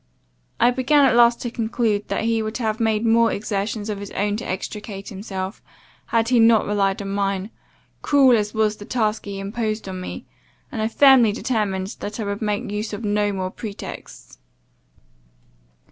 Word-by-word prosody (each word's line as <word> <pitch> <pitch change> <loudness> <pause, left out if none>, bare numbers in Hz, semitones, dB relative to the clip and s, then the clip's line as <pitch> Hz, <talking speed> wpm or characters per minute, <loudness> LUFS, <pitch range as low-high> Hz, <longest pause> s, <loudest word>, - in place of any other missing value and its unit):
I 240 +2 +5
began 275 +3 +3
at 265 - +4
last 235 0 +5
to 240 - -3
conclude, 220 -3 -1
that - - -2
he 225 0 +1
would 215 0 -3
have 220 -3 -2
made 220 -1 +1
more 230 0 +4
exertions 205 +1 -3
of 210 -2 -3
his 200 0 -7
own 205 0 0
to 240 - -6
extricate 195 +1 -5
himself, 190 -1 -6 0.5
had 230 0 +1
he 250 -2 +4
not 225 -1 +5
relied 195 -1 0
on 195 - -5
mine, 195 +1 -1 0.5
cruel 270 -4 +5
as 210 -2 0
was 215 -1 +1
the 205 - -10
task 220 -3 -1
he 200 -1 -5
imposed 215 +1 -3
on 185 -1 -5
me; - - -7 0.5
and 225 - -3
I 220 - +1
firmly 255 -2 +6
determined 205 -4 -2
that 210 +3 -6
I - - -1
would 200 +1 -4
make 210 -1 -2
use 210 +1 -3
of 205 +3 -5
no 205 0 +1
more 185 -1 -3
pretexts. 205 -1 -9
215 Hz, 175 wpm, -22 LUFS, 200-230 Hz, 0.5 s, firmly